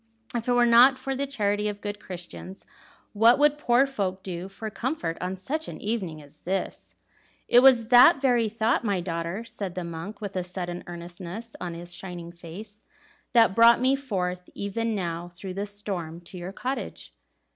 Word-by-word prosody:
"If 235 -1 -3
it 245 - +3
were 245 0 +5
not 245 +3 +7
for 270 0 -3
the 280 +1 -2
charity 210 -5 0
of 205 -1 -4
good 205 0 -5
Christians, 185 0 -8 0.5
what 225 +3 +6
would 295 +1 +3
poor 250 -1 +4
folk 195 -8 -3
do 180 0 -5
for 205 +3 -7
comfort 235 - -2
on 185 +1 -2
such 290 +12 -3
an - - -7
evening 190 -8 -3
as 145 +1 -15
this?" 190 +2 -4 0.5
"It 240 - +7
was 245 -3 +6
that 255 +5 +8
very 245 -4 +2
thought, 225 +2 +1
my 200 -4 0
daughter," 170 +4 -3
said 200 -5 -6
the 180 - -3
monk, 170 +5 -7
with 205 -3 -6
a 185 - -1
sudden 175 -1 -5
earnestness 175 +6 -8
on 175 -2 -4
his 175 +1 -8
shining 175 -1 -7
face, 190 +5 -10 0.5
"that 230 -5 +6
brought 230 +2 +7
me 260 +2 +3
forth 180 -9 -3
even 220 +3 -2
now 175 -2 -3
through 185 +2 -7
the 200 +2 -3
storm 190 -5 -4
to 175 +2 -10
your 175 +2 -6
cottage." 260 +7 -5
200 Hz, 180 wpm, -26 LUFS, 175-235 Hz, 0.5 s, that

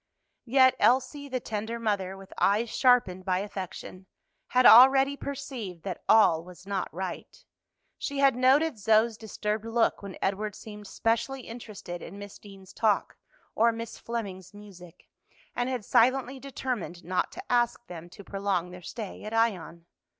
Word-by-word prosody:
Yet 260 +1 +5
Elsie, 265 +3 +2
the 255 -1 -2
tender 220 0 -4
mother, 195 -4 -2
with 195 0 -13
eyes 220 +3 +2
sharpened 240 -8 +3
by 185 -1 0
affection, 190 -1 -7 0.4
had 250 0 +2
already 270 +4 +8
perceived 255 - -7
that 185 -3 -5
all 165 -7 +5
was 180 +1 -14
not 195 -2 -3
right. 185 +2 -7 0.5
She 280 - -4
had 275 -2 +4
noted 265 +1 +3
Zoe's 220 +2 +3
disturbed 210 -1 -4
look 230 0 +1
when 200 -2 -8
Edward 205 +1 -2
seemed 210 -1 -10
specially 235 +6 -1
interested 215 -7 -8
in 195 - -9
Miss 205 0 -10
Deane's 195 -2 -14
talk 215 -3 0 0.4
or 230 +1 +3
Miss 230 0 -7
Fleming's 200 -5 -6
music, 185 -4 -14 0.5
and 245 +1 -1
had 250 -5 -3
silently 260 +2 +2
determined 250 -10 -5
not 180 +1 -1
to 375 -5 -9
ask 240 -1 +1
them 175 -3 -10
to 200 +3 -13
prolong 195 -3 -2
their 180 0 -10
stay 210 +2 -7
at 215 +1 -5
Ion. 185 -7 -1
215 Hz, 150 wpm, -28 LUFS, 190-245 Hz, 0.5 s, already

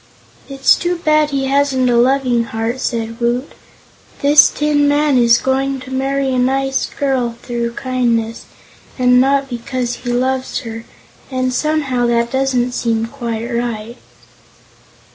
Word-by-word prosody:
"It's 270 -1 +3
too 350 +1 -1
bad 305 -2 +2
he 275 -1 -1
hasn't 270 -1 +1
a 245 - +2
Loving 245 -1 +2
Heart," 225 +3 -3
said 230 -2 -3
Woot. 240 +3 -1 0.7
"This 290 +1 +7
Tin 295 -1 +1
Man 290 0 +2
is 235 -1 +5
going 270 +1 -1
to 255 - -10
marry 270 0 -1
a 255 - +1
nice 270 +1 0
girl 260 -4 -1
through 235 -1 -3
kindness, 235 -3 -1 0.5
and 250 -1 +4
not 275 +1 +2
because 245 -1 -4
he 245 -1 -5
loves 260 +2 -1
her, 225 -2 -8 0.4
and 255 -1 -1
somehow 280 -4 0
that 235 0 0
doesn't 265 -2 0
seem 225 -2 -1
quite 230 -3 -5
right." 235 -1 -4
255 Hz, 140 wpm, -17 LUFS, 235-275 Hz, 0.7 s, This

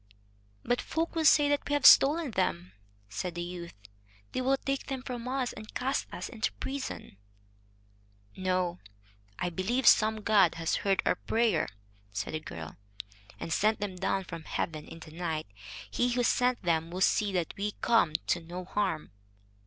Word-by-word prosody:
"But 245 - 0
folk 325 +1 -2
will 325 -1 0
say 295 -1 +6
that 290 0 0
we - - 0
have 290 -1 +1
stolen 295 0 +7
them," 90 - -1 0.4
said 170 - -4
the 175 - -3
youth; 175 -1 -7 0.6
"they - - -2
will 270 +1 +2
take 275 0 -3
them 265 -2 -4
from 245 -2 -5
us, 255 -1 -1
and 215 - -11
cast 265 +2 -1
us - - -5
into 220 -3 -2
prison." 270 - -6 1.2
"No, 185 -2 -1 0.6
I 175 - -2
believe 220 +10 -1
some 215 0 +5
god 200 -5 +4
has 165 0 0
heard 195 -1 +1
our - - +4
prayer," 225 -7 +1 0.4
said 100 +6 -4
the 155 - -1
girl, 80 - -8 0.6
"and 165 - -3
sent 215 +1 +2
them 200 -2 -3
down 195 +1 -1
from 165 -3 -8
heaven 155 -2 -3
in 165 - -11
the 155 - -11
night. 160 -2 -3 0.5
He 245 - +1
who 245 0 +1
sent 245 0 +2
them 165 -1 +1
will 180 +2 -5
see 205 +1 +3
that 175 -3 -1
we 205 +1 -2
come 225 -10 +3
to 175 - +1
no 175 +2 -7
harm." 185 - -2
195 Hz, 170 wpm, -30 LUFS, 170-250 Hz, 1.2 s, stolen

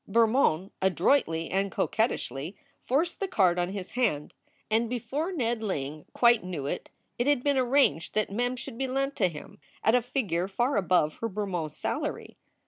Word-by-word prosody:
Bermond 215 - +3
adroitly 175 - +2
and 195 +1 0
coquettishly 170 - -1 0.2
forced 320 +7 0
the 390 - -1
card 180 - +3
on 175 0 0
his 195 -1 -6
hand, 215 - 0 0.4
and 225 +1 +2
before 280 - -2
Ned 240 -9 -1
Ling 150 -7 -3
quite 235 -3 +4
knew 175 -7 -4
it - - -4 0.3
it 240 - +1
had 290 -4 +3
been 285 -1 +2
arranged 250 - +2
that 215 -2 +1
Mem 245 +4 0
should 250 -1 -8
be 265 - 0
lent 275 +2 -1
to - - +3
him 150 -3 -11 0.2
at 220 - +4
a 250 - +5
figure 210 -8 -1
far 240 +8 0
above 180 -6 +2
her 230 - -3
Bermond 190 -6 -3
salary. - - -4
215 Hz, 170 wpm, -28 LUFS, 180-250 Hz, 0.4 s, a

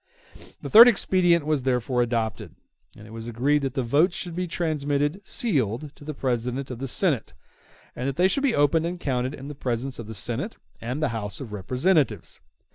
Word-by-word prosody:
The - - -4
third 230 +3 +11
expedient 175 -7 +3
was 155 -3 +1
therefore 125 -1 0
adopted, 115 -4 -2 0.4
and 105 - -12
it 110 - -13
was 115 0 -7
agreed 135 +6 +1
that 135 -1 -3
the 130 - 0
votes 155 +10 +2
should 175 -3 -5
be 180 0 -2
transmitted 150 0 -1
sealed 145 - -1
to - - -15
the 155 0 -6
President 125 +1 -2
of 120 - -6
the 135 - -3
Senate, - - -1 0.6
and 125 +2 -2
that 135 - -4
they 180 +4 +4
should 195 +9 0
be 275 -4 +2
opened 155 +3 +2
and 175 +1 -5
counted 130 -2 -2
in 135 0 -9
the 150 - -6
presence 130 -1 -3
of 115 - -7
the 110 - -7
Senate - - -3 0.2
and 125 +6 -3
the 150 - +2
House 105 -3 -4
of 120 -7 -8
Representatives. 125 - 0
135 Hz, 200 wpm, -25 LUFS, 120-160 Hz, 0.6 s, third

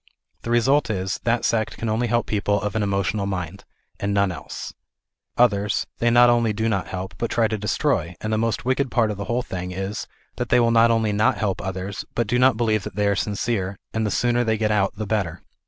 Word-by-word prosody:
The - - -6
result 130 +5 +3
is 95 -2 -2
that 120 0 +1
sect 110 -1 0
can 115 - -3
only 110 +3 0
help 120 0 +1
people 100 -1 0
of 105 +1 -3
an 110 - +1
emotional 100 0 0
mind, 90 -4 -5 0.3
and 100 0 -1
none 100 -2 +2
else; 75 -5 -7 0.6
others, 105 -4 +2
they 120 - +3
not 120 +1 +6
only 120 -2 +3
do 110 +2 -1
not 100 -4 -1
help, 95 +1 -5
but 115 - -1
try 115 -1 +2
to 110 - -2
destroy, 95 -4 -1
and 110 +1 -3
the - - +2
most 115 0 -1
wicked 130 +1 +1
part 115 -4 +2
of 105 - -5
the 100 - -4
whole 120 +4 -1
thing 90 -4 -5
is 95 +3 -4 0.3
that 125 - -3
they 125 - +5
will 115 -1 +3
not 115 0 +5
only 115 -2 +2
not 105 +1 +2
help 100 -3 -1
others, 95 +1 -4
but 120 - +1
do 120 +4 0
not 130 -3 +4
believe 110 -3 +1
that 95 - -8
they 105 0 +1
are 100 0 +2
sincere, 100 -1 -2 0.2
and 110 - 0
the 105 - 0
sooner 120 +2 +1
they 110 -2 +1
get 105 0 0
out 100 -2 +1
the 110 - -4
better. 100 -5 -2
110 Hz, 235 wpm, -23 LUFS, 100-115 Hz, 0.6 s, not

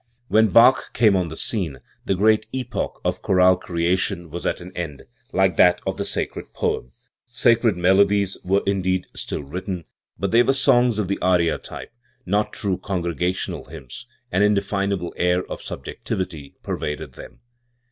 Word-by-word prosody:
When 110 +1 +5
Bach 120 +6 +5
came 110 -4 +4
on 90 -2 +1
the 80 - -7
scene, 85 - -2 0.3
the 95 - +1
great 110 +3 +3
epoch 130 -1 -4
of - - -1
chorale 90 -1 +4
creation 85 -1 -1
was 85 - -4
at - - -1
an 90 +1 -10
end, 80 -6 -5 0.3
like 95 -2 +2
that 90 0 +5
of 95 0 -2
the 100 - -2
sacred - - -3
poem, - - -1 0.4
Sacred 115 -4 +2
melodies 95 +2 +3
were 95 +2 +1
indeed 95 -2 0
still - - -4
written; 90 +3 -5 0.3
but 95 +2 -2
they 115 - +6
were 135 - +3
songs 125 -4 +3
of 105 -3 -1
the 100 - -2
aria 90 -2 +2
type, - - -9 0.3
not 105 +3 0
true 95 -3 -2
congregational 90 -1 -2
hymns; 80 - -10 0.2
an 95 - +2
inde 105 -1 +3
finable 100 -3 -2
air 90 +1 +2
of - - -7
subjectivity 80 -7 -5
pervaded 75 -2 -4
them. - - -12
95 Hz, 160 wpm, -22 LUFS, 90-105 Hz, 0.4 s, they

